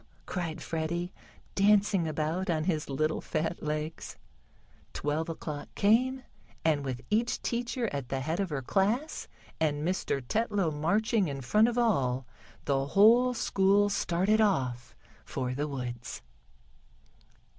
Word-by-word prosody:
cried 170 -4 -4
Freddie, 170 +3 -2 0.4
dancing 200 -3 +3
about 160 +5 -1
on 160 -2 +1
his 155 -4 -1
little 155 +3 0
fat 165 +2 -2
legs. 155 +1 -4 0.8
Twelve 155 +3 -1
o'clock 150 -2 -5
came, 255 +5 +3 0.4
and 150 -3 +2
with 130 -3 -4
each 230 +3 +1
teacher 235 0 -1
at 140 -4 -4
the 135 - -1
head 160 +6 -2
of 195 -2 0
her 140 -3 -3
class, 215 - 0 0.3
and 150 0 0
Mr. 180 -6 0
Tetlow 205 - +1
marching 200 +7 +1
in 135 -2 -4
front 210 - +4
of 240 0 -1
all, 135 - +1 0.4
the 135 -1 +1
whole 235 - +5
school 200 -1 +3
started 200 +3 +2
off 130 - 0 0.3
for 125 0 -3
the 145 +3 -2
woods. 120 -4 -5
170 Hz, 130 wpm, -29 LUFS, 145-210 Hz, 0.8 s, whole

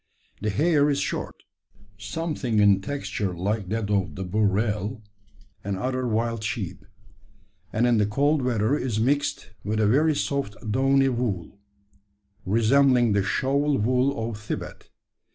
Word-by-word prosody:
The 105 - 0
hair 150 - +3
is 140 - +1
short, - - -4 0.5
something 120 +3 -3
in 100 -2 +5
texture 105 -6 -3
like 100 +1 -2
that 110 -1 -2
of 100 -3 0
the 95 - -4
burrell 105 +3 0 0.6
and 100 -1 -3
other 130 +4 -2
wild 115 0 -1
sheep; 105 - -4 0.8
and 115 +3 +1
in 120 -2 +3
the 105 - +2
cold 145 +7 +2
weather 120 0 +1
is 125 -7 -2
mixed 140 -4 0
with 110 +1 -1
a 110 - +3
very 150 +8 +3
soft 140 -7 -2 0.2
downy 135 +3 +3
wool, 110 -7 -3 0.9
resembling 120 +3 +4
the 100 - +2
shawl 140 +7 +1
wool 125 +1 +1
of 110 -2 -6
Thibet. 110 - -6
115 Hz, 135 wpm, -25 LUFS, 105-135 Hz, 0.9 s, in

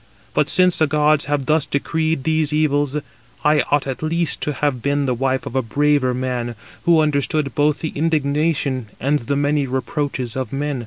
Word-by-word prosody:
But - - +1
since 180 -1 +3
the 155 - +4
gods 150 0 +2
have 145 -2 -1
thus 155 +1 +2
decreed 160 +1 -1
these 155 -1 +1
evils, 145 -2 +1 0.5
I 150 0 +4
ought 145 0 +2
at 135 -2 -4
least 165 +1 0
to 150 - -1
have 140 -3 -1
been 140 +1 0
the 130 - +1
wife 130 +1 -1
of 125 - -6
a 130 - +3
braver 140 +1 +1
man, 125 -2 -3 0.3
who 170 -2 +5
understood 145 -2 0
both 150 +2 +1
the 160 - -2
indignation 145 -4 0
and 145 +4 +1
the 140 +3 -2
many 145 0 +1
reproaches 130 -1 -2
of 130 -4 -3
men. 145 -1 -2
145 Hz, 180 wpm, -20 LUFS, 130-155 Hz, 0.5 s, who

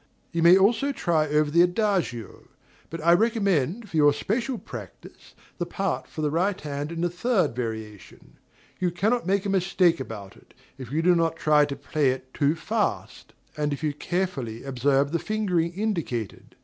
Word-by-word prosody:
You 170 - -1
may 170 +3 +8
also 230 +8 +3
try 165 - +1
over 150 0 +1
the 170 +2 +5
adagio; 180 - -1 0.4
but 165 0 -6
I 170 - +7
recommend 200 - +1
for 165 - -4
your 145 -1 +5
special 235 - -2
practice - - -11 0.2
the 175 - -2
part 175 -9 -2
for 155 - -6
the 150 - +1
right 185 +5 0
hand 145 +1 -5
in 165 0 -4
the 175 - +2
third 185 - 0
variation. 110 -4 -7 0.4
You 180 -1 +1
cannot 205 +5 0
make 195 +1 +1
a - - -1
mistake 185 -3 +2
about 110 -6 -8
it, - - -22 0.2
if 130 -2 -8
you 160 +3 0
do 180 +1 +5
not 165 -2 +1
try 150 -2 +4
to 140 -1 -5
play 145 0 0
it 130 0 -4
too 145 +1 +1
fast, 160 - -3 0.2
and 150 -1 -1
if 145 - -6
you 150 -2 0
carefully 150 -8 -3
observe 135 +1 +1
the 170 - 0
fingering 180 -6 0
indicated. 170 - -3
165 Hz, 175 wpm, -25 LUFS, 140-190 Hz, 0.4 s, may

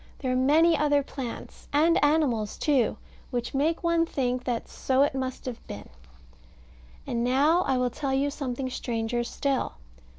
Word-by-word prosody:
There 260 -3 -2
are - - +1
many 310 +6 +4
other 290 -1 +2
plants, 260 -4 -7
and 315 +3 +3
animals 280 -9 +1
too, 265 -7 +1 0.3
which 240 -1 -3
make 310 +6 0
one 335 -1 +3
think 250 -3 -1
that 240 -2 -2
so 265 +1 +1
it 285 - +1
must 260 -1 -4
have 250 -3 -7
been. 100 - -8 1.2
And 235 -1 -1
now 285 +8 +3
I 265 -1 +2
will 250 -1 0
tell 275 +2 -3
you 280 +1 +1
something 265 -2 -3
stranger 240 -1 -2
still. 270 +2 -1
265 Hz, 160 wpm, -27 LUFS, 245-290 Hz, 1.2 s, many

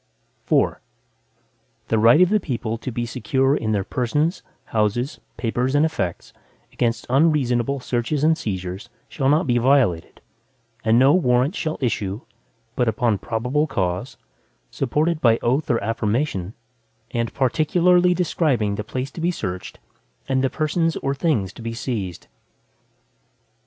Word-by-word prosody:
IV - - +3 1.1
The 110 - +2
right 115 +9 +6
of 180 - +5
the 215 +1 +3
people 115 - -3
to 130 - -5
be 120 +1 -2
secure 135 +3 +1
in 110 -6 -2
their 100 -2 +1
persons, 150 - -1 0.2
houses, 110 +5 -1 0.2
papers, 125 +3 -1
and 145 +2 +4
effects, 90 - -3 0.4
against 115 -1 -1
unreasonable 135 -2 +2
searches 125 +4 -2
and 160 +1 +4
seizures, 95 - -5 0.2
shall 135 -3 -1
not 155 +5 +3
be 120 -3 +2
violated, 120 -10 +2 0.6
and 110 +1 +4
no 135 +3 +6
Warrants 130 -1 +2
shall 155 -1 -2
issue, 105 -4 -2 0.5
but 125 - +1
upon 115 -2 +1
probable 125 +9 -1
cause, 90 -9 -2 0.5
supported 160 +1 0
by 115 -4 +4
oath 135 +6 +1
or 120 - +3
affirmation, 110 -2 -1 0.6
and 115 -1 -1
particularly 175 +7 +3
describing 145 - +1
the 105 - -3
place 130 +5 -4
to 165 - -8
be 170 - +1
searched, 95 - -5 0.5
and 130 -1 +1
the 135 - +2
persons 165 +3 0
or 135 - -1
things 135 - 0
to - - -12
be 115 0 -5
seized. 105 -8 -4
125 Hz, 140 wpm, -22 LUFS, 115-150 Hz, 1.1 s, right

